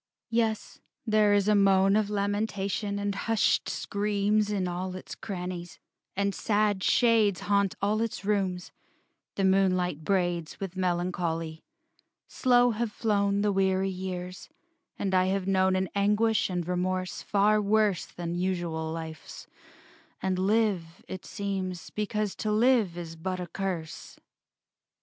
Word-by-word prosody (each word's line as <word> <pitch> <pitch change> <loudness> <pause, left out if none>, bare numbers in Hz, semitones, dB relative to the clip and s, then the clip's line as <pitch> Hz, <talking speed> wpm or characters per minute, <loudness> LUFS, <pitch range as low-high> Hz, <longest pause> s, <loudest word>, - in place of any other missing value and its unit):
VI - - -3
Yes, 220 -2 -1 0.3
there 215 -2 +4
is 200 0 +2
moan 195 -1 +4
Of 215 -1 +1
lamentation 205 0 -1
and 200 0 -1
hushed 225 +2 +1
screams 205 +1 0
In 195 -3 -1
all 180 +1 -4
its 185 - -8
crannies; 180 -3 -6 0.4
and 200 0 0
sad 205 -3 +1
shades 225 -5 +3
Haunt 200 -2 +1
all 210 +2 +2
its 220 -4 -3
rooms, 190 -4 -1 0.6
the 195 - -1
moonlight 185 -4 +2
braids, 175 -3 -1
With 195 -2 -5
melancholy. 175 -3 -2 0.6
Slow 245 -1 +3
have 225 0 -2
flown 200 -2 +1
The 210 0 +2
weary 190 0 +1
years: 180 -1 -6 0.5
and 195 -2 -2
I 185 0 +4
have 190 0 0
known 190 -1 +2
An 185 0 0
anguish 210 +2 +2
and 175 -2 -2
remorse 185 0 -2
far 210 +1 +3
worse 210 -3 +2
Than 170 -1 -5
usual 175 -3 -2
life's; 160 -2 -7 0.7
and 190 -1 -1
live, 195 -4 0
it 185 - -7
seems, 190 -3 -4
Because 210 -1 -2
to 215 - -1
live 220 -5 +3
is 165 -2 -6
but 185 +3 -4
a 180 - -3
curse.... 175 -3 -5
195 Hz, 135 wpm, -28 LUFS, 180-210 Hz, 0.7 s, there